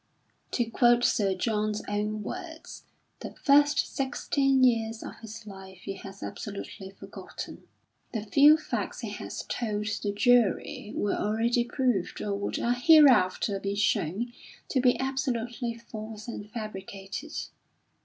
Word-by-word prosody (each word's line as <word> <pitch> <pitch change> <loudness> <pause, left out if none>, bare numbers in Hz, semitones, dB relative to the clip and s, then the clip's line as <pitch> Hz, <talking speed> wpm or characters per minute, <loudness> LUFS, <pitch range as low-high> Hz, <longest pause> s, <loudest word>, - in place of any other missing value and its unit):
To 240 - +2
quote 240 +1 +4
Sir 195 -5 +2
John's 210 +1 -1
own 210 +1 -2
words: 330 - -8 0.3
"The - - -8
first 290 0 +5
sixteen 275 0 +1
years 225 -2 +2
of - - -8
his 225 0 -9
life 190 -2 -11
he 195 - -4
has 195 0 -10
absolutely 200 -1 -7
forgotten; 195 - -9 0.4
the 220 -3 -3
few 290 +8 +6
facts 315 - -4
he - - -4
had - - -7 0.2
told 210 -3 -2 0.2
the 205 - -1
jury 215 -1 +2
were 205 - 0
already 230 +3 +1
proved, 240 -6 -1
or 205 - -2
would 200 0 -2
hereafter 245 - +5
be 200 +1 -2
shown, 205 +3 0 0.4
to 260 - +2
be 250 -1 +3
absolutely 245 -3 -2
false 220 -1 -8
and 210 -3 -6
fabricated. 205 +4 -7
225 Hz, 130 wpm, -28 LUFS, 205-250 Hz, 0.4 s, few